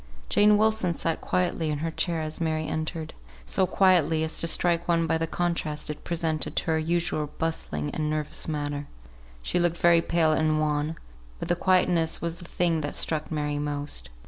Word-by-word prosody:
Jane 210 Hz, 0 st, +5 dB
Wilson 215 Hz, -5 st, +2 dB
sat 165 Hz, -1 st, -1 dB
quietly 175 Hz, -3 st, 0 dB
in 150 Hz, -, -1 dB
her 165 Hz, +2 st, -3 dB
chair 165 Hz, -1 st, -1 dB
as 155 Hz, +2 st, -4 dB
Mary 155 Hz, -1 st, 0 dB
entered; 155 Hz, 0 st, -4 dB, 0.3 s
so 185 Hz, -, +1 dB
quietly, 170 Hz, -5 st, +3 dB
as 160 Hz, -, +1 dB
to 165 Hz, -, 0 dB
strike 170 Hz, 0 st, +2 dB
one 170 Hz, -1 st, +2 dB
by 165 Hz, 0 st, +1 dB
the 165 Hz, -, -1 dB
contrast 160 Hz, -3 st, -2 dB
it 150 Hz, -, -9 dB
presented 160 Hz, -2 st, -1 dB
to -, -, +1 dB
her 160 Hz, -, +2 dB
usual 160 Hz, -2 st, -1 dB
bustling 80 Hz, -, -2 dB
and 155 Hz, -1 st, -2 dB
nervous 155 Hz, -1 st, -2 dB
manner. 145 Hz, -2 st, -3 dB, 0.6 s
She 180 Hz, -, 0 dB
looked 175 Hz, -1 st, +1 dB
very 170 Hz, -1 st, +5 dB
pale 165 Hz, -2 st, +2 dB
and 155 Hz, 0 st, +2 dB
wan; 150 Hz, +1 st, 0 dB, 0.4 s
but -, -, -6 dB
the 175 Hz, -, +3 dB
quietness 175 Hz, -2 st, +2 dB
was 170 Hz, 0 st, -3 dB
the 175 Hz, -, -10 dB
thing 170 Hz, -2 st, 0 dB
that 145 Hz, -, -3 dB
struck 155 Hz, -1 st, +1 dB
Mary 150 Hz, -1 st, -1 dB
most. 145 Hz, -, -3 dB
160 Hz, 185 wpm, -26 LUFS, 155-170 Hz, 0.6 s, Jane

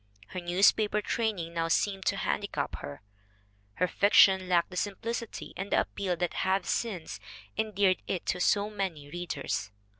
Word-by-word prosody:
Her 185 Hz, -, -5 dB
newspaper 200 Hz, +4 st, +3 dB
training 205 Hz, -6 st, -2 dB
now 165 Hz, -1 st, 0 dB
seemed 195 Hz, +3 st, 0 dB
to -, -, +3 dB
handicap -, -, -2 dB
her, 70 Hz, +7 st, -8 dB, 0.7 s
"her 180 Hz, -, +1 dB
fiction 190 Hz, -1 st, +5 dB
lacked 175 Hz, 0 st, +2 dB
the -, -, -8 dB
simplicity 225 Hz, +4 st, -4 dB
and 195 Hz, +2 st, -5 dB
the -, -, +4 dB
appeal 190 Hz, -3 st, -2 dB
that 175 Hz, 0 st, -1 dB
have 190 Hz, +1 st, +1 dB
since 195 Hz, -9 st, -2 dB, 0.4 s
endeared 200 Hz, -4 st, +1 dB
it 185 Hz, -, -2 dB
to -, -, -1 dB
so 205 Hz, +3 st, +2 dB
many 175 Hz, -8 st, -4 dB
readers." 170 Hz, -, -3 dB
190 Hz, 150 wpm, -29 LUFS, 175-205 Hz, 0.7 s, fiction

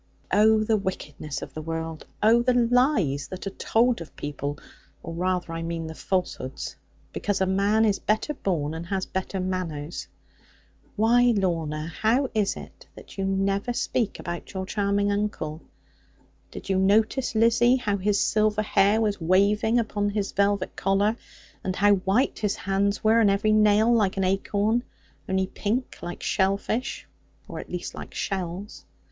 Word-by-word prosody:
'Oh, 215 Hz, +1 st, +5 dB
the 215 Hz, 0 st, +2 dB
wickedness 150 Hz, -7 st, -5 dB
of -, -, -9 dB
the 155 Hz, -, -5 dB
world! 165 Hz, 0 st, -5 dB, 0.2 s
Oh, 230 Hz, +2 st, +6 dB
the 250 Hz, +1 st, +2 dB
lies 240 Hz, -, +2 dB
that 185 Hz, +1 st, -7 dB
are 195 Hz, -, -3 dB
told 230 Hz, +2 st, +1 dB
of 165 Hz, -, -10 dB
people 145 Hz, 0 st, -4 dB, 0.5 s
or 165 Hz, -, -6 dB
rather 180 Hz, 0 st, -1 dB
I 165 Hz, -, -4 dB
mean 165 Hz, 0 st, -3 dB
the 160 Hz, -, -6 dB
falsehoods 170 Hz, -7 st, -3 dB, 0.4 s
because 205 Hz, -2 st, -1 dB
a 190 Hz, -, +2 dB
man 200 Hz, +4 st, +2 dB
is 205 Hz, -2 st, +1 dB
better 220 Hz, +8 st, 0 dB
born, 160 Hz, -, -2 dB
and 165 Hz, +1 st, -6 dB
has 190 Hz, 0 st, -1 dB
better 190 Hz, +1 st, -3 dB
manners! 175 Hz, -4 st, -4 dB, 0.9 s
Why, 235 Hz, +2 st, +4 dB
Lorna, 165 Hz, -5 st, -1 dB
how 225 Hz, -, 0 dB
is 210 Hz, -2 st, +1 dB
it -, -, -12 dB
that -, -, -12 dB
you 195 Hz, -, 0 dB
never 195 Hz, +4 st, 0 dB
speak 235 Hz, -2 st, -1 dB
about 175 Hz, +3 st, -6 dB
your 190 Hz, 0 st, -2 dB
charming 200 Hz, 0 st, 0 dB
uncle? 200 Hz, -6 st, -2 dB, 0.9 s
Did -, -, -9 dB
you 190 Hz, -1 st, +1 dB
notice, 220 Hz, +6 st, +2 dB
Lizzie, 235 Hz, +2 st, +4 dB
how 210 Hz, -6 st, -1 dB
his 200 Hz, +1 st, +1 dB
silver 215 Hz, 0 st, +2 dB
hair 205 Hz, +1 st, +3 dB
was 210 Hz, -4 st, 0 dB
waving 200 Hz, +6 st, +3 dB
upon 205 Hz, -3 st, 0 dB
his 205 Hz, -1 st, -2 dB
velvet 200 Hz, -1 st, 0 dB
collar, 200 Hz, +3 st, +1 dB, 0.5 s
and 185 Hz, -, -2 dB
how 205 Hz, +1 st, +5 dB
white 195 Hz, +7 st, +1 dB
his 210 Hz, -2 st, 0 dB
hands 200 Hz, +1 st, -1 dB
were, 220 Hz, +1 st, +5 dB
and 215 Hz, -3 st, +5 dB
every 200 Hz, +2 st, +2 dB
nail 215 Hz, +2 st, +4 dB
like 205 Hz, -4 st, +2 dB
an 195 Hz, -, +1 dB
acorn; 200 Hz, +4 st, +1 dB, 0.5 s
only 190 Hz, 0 st, +1 dB
pink 220 Hz, +6 st, -3 dB
like 175 Hz, 0 st, -6 dB
shell 195 Hz, 0 st, +2 dB
fish, 230 Hz, +5 st, -3 dB, 0.4 s
or -, -, -6 dB
at -, -, -9 dB
least -, -, -5 dB
like -, -, -9 dB
shells? 190 Hz, +1 st, -4 dB
200 Hz, 165 wpm, -25 LUFS, 185-215 Hz, 0.9 s, Oh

